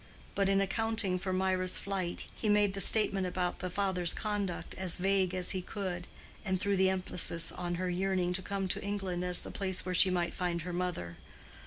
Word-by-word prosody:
But 195 -1 +1
in 195 0 +3
accounting 205 -2 0
for 185 +1 -3
Mirah's 185 0 +2
flight 190 -3 -3
he 215 - -2
made 205 -1 +4
the 195 - 0
statement 195 -2 +4
about 180 0 -2
the 185 - -3
father's 180 -2 +1
conduct 200 -5 -3
as 185 -3 0
vague 190 -1 +1
as 180 -1 -1
he 185 - -1
could, 180 -2 -5 0.4
and 190 -2 -1
threw 200 +1 +1
the 190 0 +4
emphasis 180 -3 0
on 175 -1 -3
her 185 +1 -2
yearning 185 -1 0
to 190 - 0
come 195 0 -3
to - - 0
England 195 -3 -2
as 180 0 +3
the - - -7
place 190 -2 -2
where 185 - -2
she 185 +2 +6
might 175 -1 0
find 175 -2 -2
her 180 0 -5
mother. 175 - -3
185 Hz, 200 wpm, -32 LUFS, 180-195 Hz, 0.4 s, she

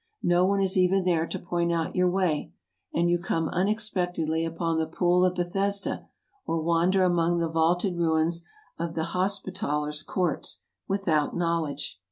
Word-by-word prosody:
No 175 +1 +4
one 200 +1 +2
is 190 0 +1
even 185 +1 +3
there 170 -2 +1
to - - -3
point 170 -1 -1
out 165 -1 -1
your 180 0 +3
way; 180 -5 0 0.4
and 170 +1 +1
you 175 0 +2
come 165 -2 -1
un 185 +3 +1
expectedly 180 -7 -1
upon 165 0 -1
the 160 - 0
Pool 175 +2 +2
of 180 0 +2
Bethesda, 195 +3 -1 0.4
or 165 - -1
wander 170 +4 +2
among 175 -1 +2
the 170 -1 +1
vaulted 170 +3 +1
ruins 165 0 +1 0.4
of 165 0 -3
the 160 0 -2
Hospitallers' 180 -6 -1
courts, 175 +1 -2 0.2
without 170 -7 +1
know 170 -2 +1
ing 140 - -5
it. 140 - -3
175 Hz, 170 wpm, -27 LUFS, 165-185 Hz, 0.4 s, No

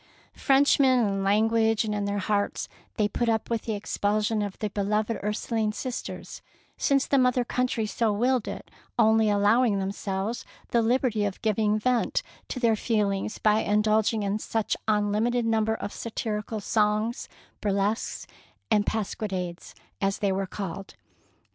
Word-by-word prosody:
Frenchmen 270 -1 +4
in 195 -1 -1
language 220 +2 +2
and 210 - -2
in 205 -1 -1
their 200 0 -1
hearts, 205 0 -1 0.3
they 210 -2 +3
put 235 +3 -1
up 220 0 -1
with 230 -2 -1
the 220 - -1
expulsion 210 +1 0
of 205 -2 -4
their 210 -2 -3
beloved 210 +3 0
Ursuline 215 +1 -1
sisters, 250 +2 -6 0.3
since 275 -2 +2
the 275 - +2
mother 250 -1 +3
country 250 -2 0
so 220 +1 0
willed 245 +3 +1
it, - - -7 0.3
only 220 -1 +4
allowing 205 +2 +3
themselves 195 +3 -3 0.3
the 235 - +3
liberty 230 -2 +1
of 200 -2 -2
giving 215 -1 +2
vent 245 +2 +1 0.2
to 255 - -4
their 230 -3 +3
feelings 210 -2 -1
by 215 0 +3
indulg 215 +1 +2
ing 220 -2 -2
in 200 +1 -1 0.2
an 225 - +3 0.2
unlimited 215 +3 +1
number 220 -1 +1
of 200 -2 -6
satirical 220 -1 -4
songs, 215 +3 0 0.3
burlesques, 205 +2 -1 0.5
and 210 -1 +3
pasquinades, 190 -4 -3 0.3
as 195 0 +1
they 200 -2 0
were 190 0 -1
called. 195 0 -6
215 Hz, 150 wpm, -26 LUFS, 205-230 Hz, 0.5 s, Frenchmen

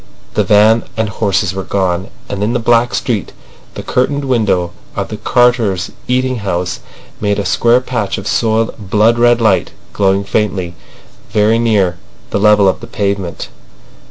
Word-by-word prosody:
The - - +2
van 110 +2 +4 0.2
and 110 -1 0
horses 100 -2 0
were 95 - -3
gone, 95 -2 -1 0.2
and 100 - -4
in 110 +3 0
the 125 - 0
black 120 +1 +2
street 110 -6 -2 0.4
the - - -6
curtained 140 +3 0
window 105 -9 +1 0.2
of - - -3
the 110 - -5
carters' 115 -5 +1 0.2
eating 130 0 0
house 90 -4 -3 0.4
made 105 -1 0
a 100 - -2
square 120 +1 +3
patch 120 -6 -2
of 95 - -6
soiled 110 -3 -1
blood 110 +2 +3
red 120 0 +4
light 110 -5 +1 0.2
glowing 100 0 +1
faintly 100 -4 -1 0.6
very 110 +2 +2
near 100 -7 +1 0.3
the - - 0
level 105 -1 +5
of 95 - +1
the - - -10
pavement. 100 -5 -3
105 Hz, 155 wpm, -15 LUFS, 95-115 Hz, 0.6 s, level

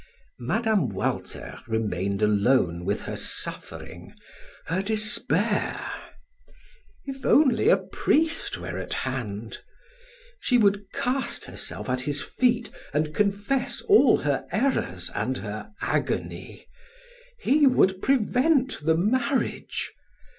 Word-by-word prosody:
Mme. 215 - +1
Walter 95 -2 -4
remained 100 -3 -1
alone 100 -5 +2
with - - -1
her - - -5
suffering, - - -4 0.5
her 180 +4 0
despair. 215 +3 0 1.1
If 270 -1 -7
only 290 - +4
a - - +6
priest 325 +2 0
were - - -5
at - - -4
hand! 115 -4 -4 0.8
She 250 - +2
would 205 -3 +2
cast 260 +2 -2
herself - - -4
at 125 0 -1
his 145 +2 -1
feet 240 - 0 0.2
and 150 0 0
confess 205 - 0
all 425 -2 +6
her - - -1
errors 90 - 0
and 130 0 -1
her 105 - -6
agony - - -2 0.7
he 290 - +4
would 190 -7 +3
prevent 265 - +2
the 160 +1 +3
marriage! 250 +8 0
200 Hz, 105 wpm, -26 LUFS, -, 1.1 s, a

